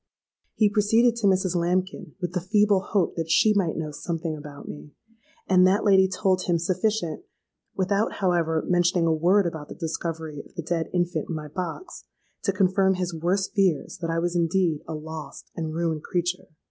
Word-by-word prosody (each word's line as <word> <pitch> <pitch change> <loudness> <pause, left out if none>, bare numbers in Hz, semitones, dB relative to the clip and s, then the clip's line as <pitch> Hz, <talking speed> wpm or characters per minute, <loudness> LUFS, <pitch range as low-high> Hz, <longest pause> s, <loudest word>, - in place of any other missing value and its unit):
He 215 - +4
proceeded 225 +3 +3
to 220 -3 +1
Mrs. 185 -1 +2
Lambkin, 180 +2 -1
with 180 -2 -3
the 180 - -1
feeble 205 +2 +3
hope 195 -1 -1
that 165 -1 -3
she 215 +6 +4
might 190 -6 0
know 155 -2 -3
something 165 +1 -4
about 145 -1 -10
me; 145 0 -9 0.5
and 185 -1 +5
that 195 +3 +2
lady 190 -2 +5
told 185 -1 0
him 175 -1 +2
sufficient 180 0 -1 0.5
(without, 200 +3 0
however, 170 -4 0
mentioning 175 -1 +2
a 165 - +3
word 180 +5 +3
about 160 -3 -5
the - - -8
discovery 160 -3 -4
of - - -21
the 170 - -4
dead 165 0 -2
infant 175 -3 -1
in 165 - -2
my 150 -1 -6
box) 185 - -6 0.4
to - - +1
confirm 190 0 +2
his 180 -1 -3
worst 180 +4 -1
fears 190 -8 +1
that 165 - -3
I 165 - 0
was 175 +1 -1
indeed 170 -2 +1
a 160 - -4
lost 155 -2 -8
and 160 -2 -3
ruined 165 -1 -1
creature! 175 +2 -2
175 Hz, 185 wpm, -25 LUFS, 160-190 Hz, 0.5 s, and